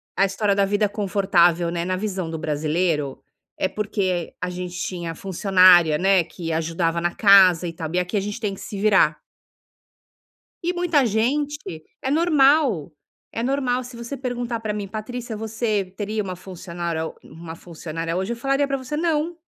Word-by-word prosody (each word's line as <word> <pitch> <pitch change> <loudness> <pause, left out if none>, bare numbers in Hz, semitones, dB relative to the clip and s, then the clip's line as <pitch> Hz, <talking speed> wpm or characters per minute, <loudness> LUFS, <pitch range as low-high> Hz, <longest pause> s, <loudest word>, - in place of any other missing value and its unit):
a 195 - +4
história 200 +1 0
da 200 - +3
vida 205 +1 +1
confortável, 185 -4 +2
né, 170 0 -2
na 185 +1 -1
visão 185 -5 -3
do 160 - -4
brasileiro, 155 -1 -1 0.4
é 190 - +2
porque 190 -4 -2
a 180 - -2
gente 180 0 -6
tinha 170 -3 -4
funcionária, 180 -3 +5
né, 190 -1 +3
que 165 -1 -6
ajudava 165 +1 -1
na 175 0 0
casa 185 -4 +6
e 165 - -5
tal. 160 0 -6
E 180 - +2
aqui 180 +3 -3
a 200 - +2
gente 205 +3 -5
tem 210 -3 -2
que - - -10
se 200 - -6
virar. 195 -7 +3 1.4
E 355 +1 0
muita 335 -6 +2
gente 245 - -1 0.2
é 265 - -2
normal, 285 - +3 0.4
é 230 - -3
normal. 255 -1 0
Se 245 0 -10
você 235 +4 -6
perguntar, 245 -2 -3
pra 215 -2 -3
mim, 205 -1 -4
"Patrícia, 225 +2 -6
você 220 -2 -1
teria 210 +1 -2
uma 185 -1 -5
funcionára 170 -3 -5
ou - - -10
uma 160 +1 -10
funcionária 165 0 -5
hoje?" 190 +5 -2
Eu - - -8
falaria 275 +3 +1
pra 275 0 -1
você: 260 +3 -5
"Não". 330 +1 -1
195 Hz, 175 wpm, -23 LUFS, 170-235 Hz, 1.4 s, casa